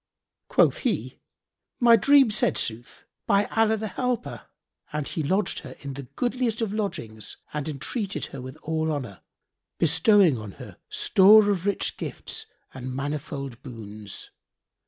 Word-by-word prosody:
Quoth - - +3
he, - - -2 0.6
"My 235 -1 +7
dream 275 +1 +5
said 215 - +2
sooth, 115 +1 -3 0.2
by 200 +1 +4
Allah 220 0 +3
the 220 +1 -3
Helper!"; 250 +4 -3 0.4
and 150 -2 -3
he 160 - -3
lodged 190 +8 0
her 130 -4 -10
in 140 -1 -6
the 135 -1 -8
goodliest 245 -2 0
of 220 -3 -1
lodgings 110 - -4 0.2
and 150 0 -3
entreated 195 - -3
her 135 - -6
with 130 +1 -9
all 160 0 -1
honour, 125 -10 -5 0.6
bestowing 165 - +4
on 105 -3 -8
her - - -11
store 205 +2 +6
of 190 -1 -1
rich 200 - -1
gifts - - -5 0.3
and 130 0 -6
manifold 140 -2 -4
boons. 110 -5 -8
160 Hz, 140 wpm, -26 LUFS, 130-215 Hz, 0.6 s, My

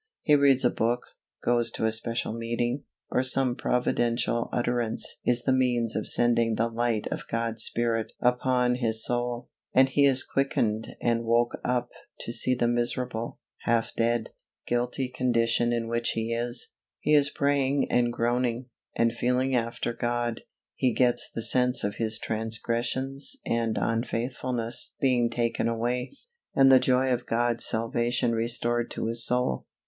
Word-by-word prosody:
He 150 - +3
reads 140 -3 +4
a 120 - +4
book, 120 +2 0 0.4
goes 120 -1 +2
to - - -2
a 110 - +2
special 115 0 -2
meeting, 120 +3 -2 0.3
or - - +2
some 130 -1 +2
providential 120 -1 0
utterance 120 -2 -1
is 120 0 +2
the 130 - +2
means 120 -3 +1
of - - -1
sending 115 -1 +3
the 115 +2 0
light 115 -2 -1
of - - -5
God's 115 -1 -1
Spirit 115 -1 -1
upon 125 0 +1
his 110 -3 +1
soul, 120 0 -2 0.2
and 130 +1 +6
he 140 +2 +3
is 135 -1 +4
quickened 115 -5 -1
and 115 -1 +1
woke 120 +1 +1
up 125 -1 -1 0.3
to 115 - -4
see 125 +1 +1
the 120 -1 +1
miserable, 120 -1 -2 0.3
half 115 -1 +1
dead, 115 0 0 0.3
guilty 120 +2 -1
condition 120 -2 +1
in 115 -1 -1
which 115 0 0
he 115 +1 -2
is; 120 +1 -3 0.3
he 150 - +1
is 145 -1 +5
praying 140 -1 +1
and 120 -1 +2
groaning, 120 +1 -1 0.2
and 115 0 +2
feeling 125 +2 0
after 120 -1 -1
God; 120 -1 -2 0.3
he 125 -3 0
gets 125 -2 +2
the 115 - -4
sense 125 +1 +3
of 100 0 -2
his 110 -1 0
transgressions 120 - -1
and 115 -1 -1
unfaithfulness 120 +1 -2
being 125 -3 +2
taken 115 -1 -1
away, 120 +2 -2 0.4
and 135 0 +6
the 130 - +8
joy 130 0 +2
of 125 0 -4
God's 120 0 0
salvation 120 +2 0
restored 120 +1 0
to - - -4
his 115 +1 +3
soul. 125 - +1
120 Hz, 155 wpm, -27 LUFS, 115-125 Hz, 0.4 s, the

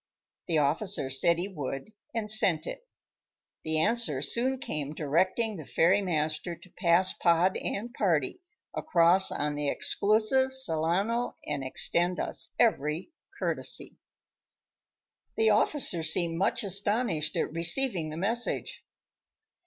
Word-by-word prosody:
The 165 - 0
officer 150 -1 +1
said 170 +5 +3
he 175 +3 -3
would, 145 0 -7 0.2
and 215 -2 -2
sent 175 -7 +3
it. - - -8 0.8
The 160 0 -1
answer 160 - +1
soon 260 - +2
came 150 - -5
directing 185 +9 -1
the 155 - -9
ferrymaster 170 -2 0
to 185 - -19
pass 175 +2 +2
Pod 175 +2 +1
and 235 +4 -5
party 170 - -1 0.3
across 175 +2 +3
on 150 0 -2
the 145 -1 -2
exclusive 220 - +1
Solano 200 +1 0
and 145 -2 -4
extend 175 +7 0
us - - -3
every 160 - 0 0.3
courtesy. - - -3 1.4
The 220 -1 +3
officer 210 - +2
seemed 165 +1 +2
much 195 +4 0
astonished 200 -4 0
at - - -2
receiving 170 +1 +2
the 155 - -7
message. 235 - -2
175 Hz, 120 wpm, -28 LUFS, 155-215 Hz, 1.4 s, said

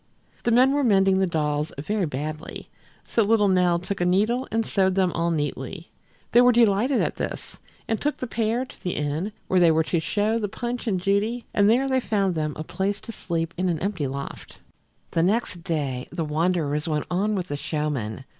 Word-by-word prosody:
The - - 0
men 255 +3 +5
were 285 0 +1
mending 195 -4 +4
the 190 - +2
dolls 150 -2 -1
very 190 +5 -1
badly, 155 +3 -6 0.3
so 230 - 0
little 210 -1 +3
Nell 180 -2 +3
took 180 +2 -4
a - - +3
needle 215 +8 +2
and 225 0 0
sewed 190 -2 +1
them 185 -2 +2
all 170 0 0
neatly. 150 +2 -3 0.4
They 240 - +7
were 250 0 +6
delighted 235 +2 +3
at - - -2
this, - - -5 0.3
and 225 - -1
took 295 +1 0
the - - -4
pair 230 +1 -1
to - - -16
the 180 - -2
inn 150 +7 -2 0.2
where 185 - +3
they 175 -2 +6
were 160 0 +3
to 170 +1 0
show 210 +7 0
the 210 - -1
Punch 240 +3 -4
and 190 -4 +1
Judy, 205 +6 0
and 205 0 +4
there 255 +4 +3
they 260 -1 +2
found 200 -6 0
them 155 -2 -2
a 155 - -5
place 195 +5 -2
to - - -8
sleep 165 -4 -3
in 185 0 +1
an 170 - 0
empty 180 -4 -2
loft. 140 +1 -7 0.5
The 165 - +1
next 185 -2 0
day 140 -7 -2
the 165 - -2
wanderers 155 -1 0
went 150 -2 -1
on 205 +4 +1
with 185 -2 -3
the 145 - -2
showmen. 140 -6 -3
185 Hz, 205 wpm, -24 LUFS, 160-220 Hz, 0.5 s, They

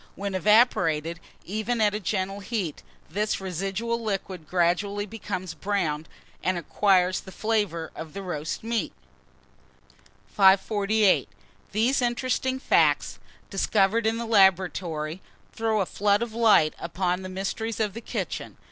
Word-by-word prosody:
When 200 0 -4
evaporated, 170 -5 +3 0.3
even 220 +5 -2
at 210 -1 +3
a 210 - -2
gentle 195 0 -2
heat, 195 -6 -3 0.3
this 210 +6 -1
residual 195 +5 -2
liquid 190 -6 -4
gradually 185 +4 +1
becomes 190 -4 -5
brown, 165 -4 -2 0.4
and 185 -1 +1
acquires 185 +2 +2
the 190 - -11
flavour 205 -7 -1
of 160 +1 -8
roast 175 -5 -4
meat. 230 0 -1 1.3
548. 200 +1 +3 0.4
THESE 235 +6 +2
INTERESTING 255 +2 0
FACTS, 265 - +2 0.3
discovered 205 +3 +2
in 225 +1 +1
the 235 - -3
laboratory, 185 -5 +2 0.3
throw 220 -2 0
a - - +1
flood 205 +4 +1
of 235 -2 -6
light 220 -9 +4
upon 180 +2 -1
the 185 - -6
mysteries 200 +4 -3
of 210 -3 0
the 230 - -7
kitchen. - - -5
195 Hz, 125 wpm, -26 LUFS, 180-220 Hz, 1.3 s, light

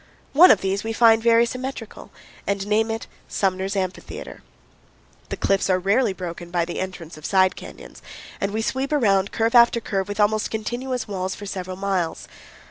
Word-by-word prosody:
One 340 +6 +8
of 185 - +5
these 195 +1 -1
we 225 0 -3
find 225 -1 +5
very 230 0 +5
symmetrical 255 -2 -7 0.4
and 200 -1 -1
name 215 +2 +1
it 225 0 -3 0.2
Sumner's 190 0 -1
Amphitheater. 185 -1 -5 0.9
The - - -4
cliffs 195 0 +1
are 185 - +4
rarely 200 +5 +2
broken 175 -2 -7
by 175 -1 0
the 175 - -5
entrance 175 -4 -6
of 155 - -13
side 185 -1 +3
canyons, - - -11 0.4
and 195 - -1
we 220 +2 -2
sweep 265 +4 -2
around 200 -9 +2
curve 225 +1 0
after 235 -1 +6
curve 195 -3 -2
with 205 +1 -6
almost 215 +1 +2
continuous 245 +3 -3
walls 190 -2 -3
for 205 - -9
several 185 -2 -5
miles. 190 -4 -2
200 Hz, 175 wpm, -23 LUFS, 190-225 Hz, 0.9 s, One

